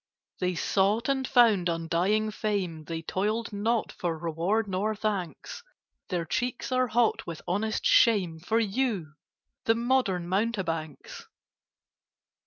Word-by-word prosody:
They 180 0 0
sought 205 +7 +1
and 265 -1 0
found 220 -8 +4
undying 175 +6 0
fame: 190 -8 -2
They 165 0 -5
toiled 215 +6 -2
not 220 +3 0
for 170 -2 -3
reward 170 +7 -1
nor 200 +3 -1
thanks: 210 - -4 0.5
Their 175 -4 -1
cheeks 245 +8 -2
are 255 0 +2
hot 235 0 +1
with 165 -2 -6
honest 215 +4 -1
shame 190 -9 +4
For 220 +7 0
you, 210 - -1 0.5
the 225 - +4
modern 230 -8 +1
mountebanks! 180 - -3
205 Hz, 120 wpm, -28 LUFS, 175-230 Hz, 0.5 s, found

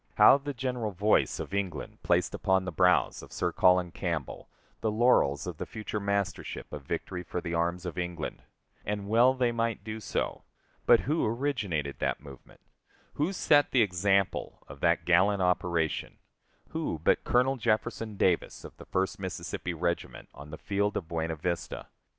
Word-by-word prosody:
How 140 - +7
the 145 +1 -4
general 125 -3 -2
voice 105 +2 +2
of - - -6
England 95 -5 -3
placed - - +1
upon 95 0 +1
the 90 - -3
brows 90 +1 +3
of - - -13
Sir - - -1
Colin 90 -1 +3
Campbell 85 -6 -4 0.3
the 110 - 0
laurels 105 - +3
of - - -5
the - - -4
future 105 -1 -4
mastership 100 -3 -3
of 75 - -5
victory 90 +6 -4
for 90 0 -4
the 85 -1 -5
arms 85 +2 -1
of 90 0 -4
England! 90 -3 -4 0.4
And 100 -1 -3
well 120 +5 +5
they 125 -2 +1
might 115 -3 -1
do 110 0 -5
so. 110 - -3 0.4
But 120 - +7
who 155 +5 0
originated 110 - -2
that - - -1
movement; 70 -3 -14 0.5
who 150 +6 0
set 145 -6 +3
the 125 -4 +4
example 95 0 0
of 70 +1 -11
that 85 0 +2
gallant 95 +3 +4
operation 85 -3 0 0.5
who 160 - -3
but - - +3
Colonel 130 +2 +2
Jefferson 110 -2 -1
Davis, 90 -3 +1
of - - -11
the - - -11
First 95 +1 -1
Mississippi 90 -2 -4
Regiment, 85 -7 -3
on 70 +2 -11
the 80 - -7
field 100 +1 -1
of 85 - -5
Buena 80 -1 -2
Vista? 85 +2 -4
95 Hz, 170 wpm, -29 LUFS, 85-115 Hz, 0.5 s, How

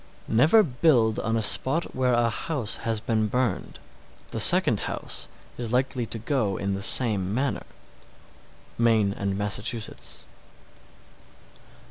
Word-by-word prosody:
703. - - -4
Never 160 - +5
build 125 - +2
on 115 +1 -1
a 110 - 0
spot 145 +10 +3
where 130 -1 +1
a 120 -1 +2
house 120 0 -3
has 115 -1 -2
been 110 -1 -1
burned. 125 -3 -2 0.5
The - - -4
second - - +4
house - - -3 0.3
is 120 -1 -3
likely 125 -2 0
to 115 - -6
go 115 -5 -1
in 100 0 -2
the 100 - -4
same 100 -4 +1
manner. 135 +2 -2 1.1
_Maine 110 -4 +2
and 100 0 -3
Massachusetts. 105 +3 -4
115 Hz, 130 wpm, -25 LUFS, 105-130 Hz, 1.1 s, Never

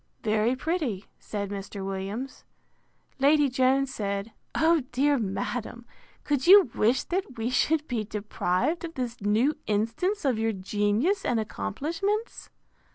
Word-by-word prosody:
Very 220 +3 +2
pretty, 265 - -2
said 200 -2 -5
Mr. 195 0 -6
Williams. 195 +7 -5 0.8
Lady 290 +1 +4
Jones 260 +1 +2
said, 200 +1 -3 0.2
O, 325 0 +4
dear 280 +2 +2
madam! 235 +3 -4 0.4
could 285 -1 0
you 380 - +8
wish 240 +4 +2
that 375 - -3
we 225 +2 -1
should 300 +4 +1
be 235 -4 -1
deprived 210 - -1
of 330 -1 -6
this 245 -3 -4
new 220 +9 +2
instance 230 - 0
of 250 -5 +2
your 225 0 +1
genius 210 - 0
and 235 - +1
accomplishments? 330 - -3
245 Hz, 130 wpm, -27 LUFS, 210-295 Hz, 0.8 s, you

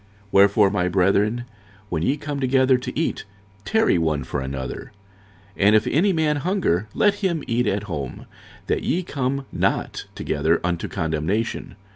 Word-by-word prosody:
46:011:033 - - -31
Wherefore, 100 +1 +5
my 90 -3 0
brethren, 100 +6 +2 0.4
when 80 -4 -1
ye 135 - +1
come 145 -1 -4
together 130 -1 +3
to 130 - -5
eat, 165 - -1 0.4
tarry 220 - +3
one 80 -3 0
for 70 - -4
another. 65 -1 -5 0.7
46:011:034 100 - +3
And 105 - +6
if 110 - +4
any 190 +7 +2
man 160 -3 +1
hunger, 145 - 0
let 205 -1 +4
him 185 -7 -1
eat 120 0 0
at 100 0 0
home; 75 -10 -5 0.4
that - - 0
ye 180 +3 0
come 140 -3 -2
not - - -1
together 80 +3 0
unto 85 -1 -1
condemnation. 80 +8 -2
110 Hz, 160 wpm, -23 LUFS, 85-145 Hz, 0.7 s, And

